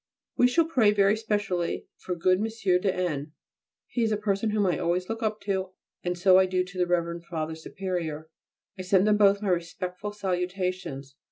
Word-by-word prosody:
We 245 - +5
shall 325 +6 +3
pray 255 -10 +3
very 200 0 +4
specially 205 -5 -2
for 180 - -4
good 185 +2 +2
M. 215 - 0 0.3
de 195 +1 +1
N. 155 -5 -3 0.5
He 245 - -3
is 225 -1 +2
a 210 - +1
person 210 +1 0
whom 210 -1 +1
I 175 -5 +1
always 180 +2 0
look 225 +1 -4
up 215 -1 -1
to, 190 -2 -2 0.3
and 180 0 -2
so 185 +1 +6
I 190 - +4
do 185 0 +1
to 180 +1 -11
the 180 - +2
Rev. 170 -1 -1
Father 160 -2 -3
Superior. 160 -2 -4 0.5
I - - -2
send 190 +1 +3
them 210 0 +4
both 200 0 +4
my 200 - 0
respectful 180 +3 -3
salutations. 180 -7 -3
185 Hz, 190 wpm, -27 LUFS, 175-205 Hz, 0.5 s, so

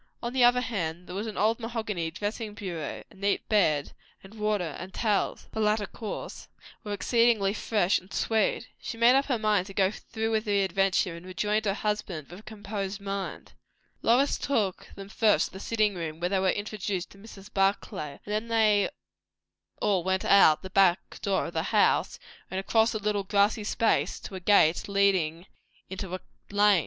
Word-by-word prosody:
On 235 +1 -3
the 260 -2 +3
other 245 +1 +5
hand, 180 -7 -3
there 180 - -9
was 210 +3 -3
an 215 - -6
old 220 +3 +2
mahogany 220 -7 -3
dressing 210 +4 -4
bureau; 170 -7 -5
a - - -16
neat 200 +1 -1
bed; 155 -9 +2 0.3
and 195 +2 -14
water 210 -7 -1
and 185 +1 -7
towels 210 -3 0
(the - - -5
latter 210 0 +2
coarse) 215 +1 -7 0.4
were 210 - -6
exceedingly 225 -2 +2
fresh 205 -4 +1
and 185 - -20
sweet. 220 -1 0
She 230 - -6
made 235 +2 +6
up 275 +1 +3
her 255 -4 +1
mind 210 -4 +1
to 195 - -11
go 190 -1 +3
through 220 +1 -4
with 220 0 0
the 200 -2 +2
adventure, 190 -2 +1
and 170 - -10
rejoined 210 +4 -1
her 195 -1 +1
husband 210 -8 -3
with 180 - -9
a - - -13
composed 205 -2 -5
mind. 200 -1 -5 0.5
Lois 255 +5 +3
took 210 -9 -1
them 195 0 -9
first 215 +1 +2
to - - -24
the 190 - -8
sitting 215 0 +1
room, 165 -3 -5
where 175 +1 -1
they 195 0 +1
were 190 0 +2
introduced 205 -2 -3
to 195 - -16
Mrs. 200 -2 -13
Barclay, 195 -7 -1
and 210 - -4
then 215 +2 -1
they 215 -3 +3 0.9
all 190 -4 +1
went 190 +1 0
out 160 -6 +6
at - - -33
the 190 - -8
back 190 -2 +2
door 195 -2 0
of - - -7
the - - 0
house, - - +2 0.3
and 190 - -3
across 225 +4 +2
a - - +2
little 210 -1 -1
grassy 205 +2 +2
space, 220 +2 +1
to - - -9
a 190 - -5
gate 180 -2 +3
leading 190 -4 +1 0.5
into 190 -1 -4
a - - -6 0.3
lane. 205 -1 +4
200 Hz, 190 wpm, -28 LUFS, 190-215 Hz, 0.9 s, made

